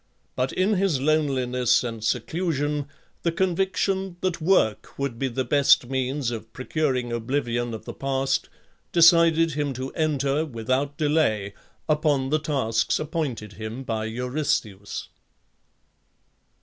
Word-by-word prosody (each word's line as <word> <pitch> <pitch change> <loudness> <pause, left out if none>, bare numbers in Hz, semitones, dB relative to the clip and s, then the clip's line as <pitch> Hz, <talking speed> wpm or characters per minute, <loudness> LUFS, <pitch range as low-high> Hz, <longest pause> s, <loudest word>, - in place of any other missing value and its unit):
But 130 +1 0
in 195 +3 +1
his 185 -7 +1
loneliness 130 -5 +2
and 115 -3 -5
seclusion 150 +2 -1 0.3
the 170 - +1
conviction 190 +1 0
that 180 -3 -1
work 155 - +1
would 140 -4 -3
be 135 - 0
the 130 +1 -2
best 135 -1 +4
means 130 0 -1
of 115 -1 -7
procuring 130 -3 -1
oblivion 120 0 -1
of 110 - -10
the - - -6
past 135 0 -1 0.4
decided 165 -1 +6
him 145 -1 -1
to 130 +1 -5
enter, 145 -2 0
without 135 +1 -2
delay, 145 -10 +1 0.3
upon 150 -3 +2
the 155 - +3
tasks 135 -7 0
appointed 140 - -3
him 110 +5 -6
by 110 -3 -2
Eurystheus. 115 -4 -2
135 Hz, 125 wpm, -25 LUFS, 120-155 Hz, 0.4 s, decided